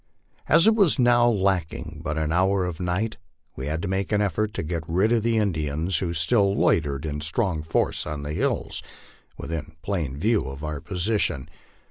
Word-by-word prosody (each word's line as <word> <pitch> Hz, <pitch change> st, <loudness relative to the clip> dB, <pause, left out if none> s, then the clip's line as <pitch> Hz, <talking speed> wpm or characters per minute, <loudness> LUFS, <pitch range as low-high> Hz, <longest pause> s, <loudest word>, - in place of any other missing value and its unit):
As 165 Hz, +3 st, +6 dB
it 220 Hz, -, +6 dB
was 200 Hz, -9 st, +4 dB
now 120 Hz, -1 st, +4 dB
lacking 90 Hz, -7 st, -1 dB
but 80 Hz, -2 st, -2 dB
an 80 Hz, 0 st, -1 dB
hour 95 Hz, +2 st, +2 dB
of 90 Hz, -3 st, -5 dB
night, 90 Hz, +5 st, -1 dB, 0.4 s
we 65 Hz, -, -5 dB
had 80 Hz, +2 st, -2 dB
to -, -, -2 dB
make 95 Hz, +2 st, -2 dB
an 105 Hz, -, +2 dB
effort 105 Hz, +1 st, 0 dB
to -, -, -2 dB
get 85 Hz, +1 st, -3 dB
rid 95 Hz, +7 st, +2 dB
of 120 Hz, -2 st, +3 dB
the 115 Hz, +1 st, +1 dB
Indians, 80 Hz, -3 st, 0 dB
who 90 Hz, -3 st, -2 dB
still 100 Hz, +4 st, +3 dB
loitered 70 Hz, -2 st, +1 dB
in 75 Hz, -1 st, -3 dB
strong 85 Hz, +1 st, -1 dB
force 80 Hz, +2 st, 0 dB
on 75 Hz, -1 st, -4 dB
the 75 Hz, +1 st, -4 dB
hills, -, -, -1 dB, 0.6 s
within 80 Hz, -1 st, -6 dB
plain 85 Hz, -9 st, -2 dB
view 105 Hz, -, +1 dB
of 70 Hz, +2 st, -7 dB
our 75 Hz, -2 st, -4 dB
position. 90 Hz, -7 st, -1 dB
90 Hz, 185 wpm, -25 LUFS, 75-105 Hz, 0.6 s, As